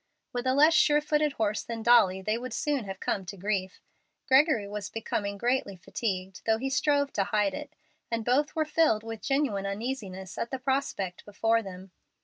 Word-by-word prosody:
With 245 +1 -2
a 260 - +3
less 305 +3 +6
sure 295 -2 +5
footed 300 -1 +1
horse 215 -3 0
than 230 -1 -6
Dolly 205 -6 +5
they 215 +2 0
would 245 0 -5
soon 285 -6 -1
have 190 -1 -6
come 195 - -1
to 200 - -7
grief. 190 -1 -2 0.5
Gregory 265 -6 +4
was 205 -1 -5
becoming 200 -2 -3
greatly 240 -3 0
fatigued, 185 0 -4
though 220 0 +4
he 265 +3 -3
strove 285 0 +2
to 195 - +1
hide 205 -1 +1
it, 295 +4 -7 0.3
and 230 -1 -2
both 280 +5 +2
were 315 -1 +1
filled 300 -8 +2
with 225 -1 -7
genuine 270 -9 0
uneasiness 200 -4 -5
at 235 - -2
the 265 - -3
prospect 255 -9 -2
before 225 +2 +1
them. 190 -2 -10
225 Hz, 185 wpm, -28 LUFS, 200-270 Hz, 0.5 s, less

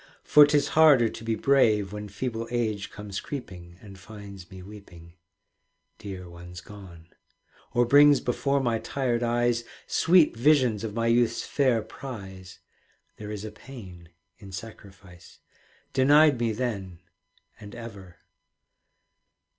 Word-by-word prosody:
For 150 -1 +7
'tis 145 -1 +1
harder 145 -7 +5
to 115 - -10
be 115 0 -1
brave 110 -7 +2
When 105 0 -7
feeble 115 +2 -4
age 110 -5 -2
comes 105 -2 -7
creeping, 90 -11 -9
And 100 -2 -13
finds 100 -3 -12
me 95 -1 -11
weeping 90 -4 -14 0.9
(Dear 95 -3 -8
ones 90 +1 -11
gone), 90 -3 -13 0.6
Or 120 -1 +3
brings 145 +2 +6
before 140 +3 -1
my 115 -3 0
tired 125 -3 -2
eyes 120 0 0 0.2
Sweet 165 -6 +3
visions 125 -4 +2
of 110 -2 -5
my 115 0 -1
youth's 115 0 +2
fair 130 -6 +1
prize 95 -8 -10 0.6
(There 105 -1 -8
is 105 0 -6
a 110 - -7
pain 95 -8 -12 0.3
in 100 -2 -12
sacrifice), 95 -2 -12 0.6
Denied 145 +1 +5
me 115 -1 0
then 100 -7 -4 0.6
and 105 +1 -11
ever. 100 -7 -10
110 Hz, 130 wpm, -26 LUFS, 95-125 Hz, 0.9 s, For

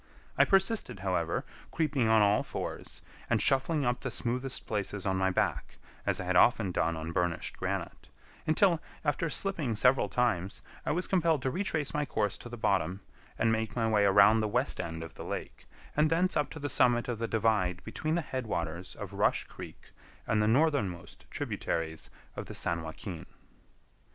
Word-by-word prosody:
I - - +5
persisted, 195 - +2
however, 90 -3 -1 0.2
creeping 140 -7 0
on 110 -1 +5
all 105 +1 +4
fours, - - -6 0.3
and - - +3
shuffling 140 +2 +2
up 120 0 +1
the 125 - -3
smoothest 125 +2 -1
places 105 -2 -3
on 95 -1 +1
my 95 0 +2
back, 95 - -1 0.3
as - - +1
I - - -3
had 90 0 -1
often 110 -1 +4
done 85 -1 0
on 80 +1 -5
burnished 90 -1 -1
granite, - - -4 0.4
until, 170 +2 +4 0.3
after 145 +3 0
slipping 155 - -2
several 125 -1 +4
times, 100 -5 0 0.2
I - - +2
was 180 +4 +1
compelled 165 -6 +2
to 130 - 0
retrace 155 -5 -1
my 150 - 0
course 105 -7 -1
to 120 - -9
the 120 - -7
bottom, 95 -2 0 0.4
and 115 - +2
make 110 0 -1
my 115 -2 +1
way 105 -2 +3
around 100 +3 +6
the 110 - +1
west 125 +6 0
end 80 -1 -5
of 80 0 -9
the - - -8
lake, - - -6 0.3
and 150 +1 +3
thence 175 +3 +2
up 150 - +1
to 160 - -8
the 145 - -3
summit 120 -2 +3
of 120 -3 -3
the 115 - -1
divide 105 -6 +1
between 155 +8 -2
the 175 - +1
head 130 -5 -4
waters 85 -1 -3
of - - -7
Rush - - +2
Creek - - -11 0.3
and 105 - +1
the 105 - +2
northernmost 110 - 0
tributaries 80 -1 -3 0.3
of - - -6
the - - -7
San 85 0 0
Joaquin. 80 +2 -7
110 Hz, 185 wpm, -30 LUFS, 95-145 Hz, 0.4 s, around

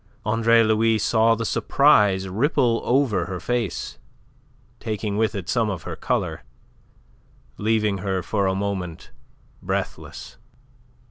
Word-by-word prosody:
Andre 115 +1 +4
Louis 110 +1 +2
saw 115 +1 +3
the 115 +1 -4
surprise 105 -9 +3
ripple 115 - +1
over 120 -9 +1
her 90 -1 -5
face, 120 -3 -3 0.8
taking 105 -2 -3
with 110 -1 0
it 95 -4 -5
some 115 -3 +1
of 90 -6 -5
her - - -6
colour, - - -2 1.2
leaving 105 -2 +1
her 95 -1 -2
for 100 -3 0
a 95 - 0
moment 95 -4 -4 0.5
breathless. - - -5
110 Hz, 120 wpm, -23 LUFS, 95-115 Hz, 1.2 s, Andre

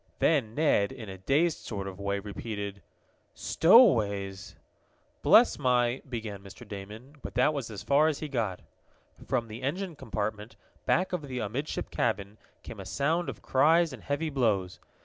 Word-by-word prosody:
Then 125 -9 +2
Ned, 145 -10 +2
in 110 -3 -9
a 95 -1 -8
dazed 150 - +1
sort 100 -3 -5
of 95 0 -8
way, 100 0 -1
repeated: 100 -1 -6 0.5
"Stowaways!" 105 - +4 0.7
"Bless - - +6
my 125 0 +2
" - - -21
began 110 -5 -5
Mr. 100 +4 -12
Damon, 105 +8 -9
but - - -8
that 125 +5 +3
was 135 -6 -4
as 105 -3 -7
far 145 +3 +4
as 155 -3 0
he 155 - -5
got. 115 -10 -2 0.6
From 120 -3 -1
the 110 +3 -8
engine 170 +6 -3
compartment, 110 -3 -4 0.3
back 185 +1 +2
of 155 -5 -3
the 130 -2 -5
amidship 125 +7 -3
cabin, 105 -2 -2 0.2
came - - -9
a - - -7
sound 165 +5 0
of - - -8
cries 160 +5 +3
and - - -9
heavy 155 +2 -2
blows. 105 -9 0
120 Hz, 165 wpm, -29 LUFS, 100-145 Hz, 0.7 s, Bless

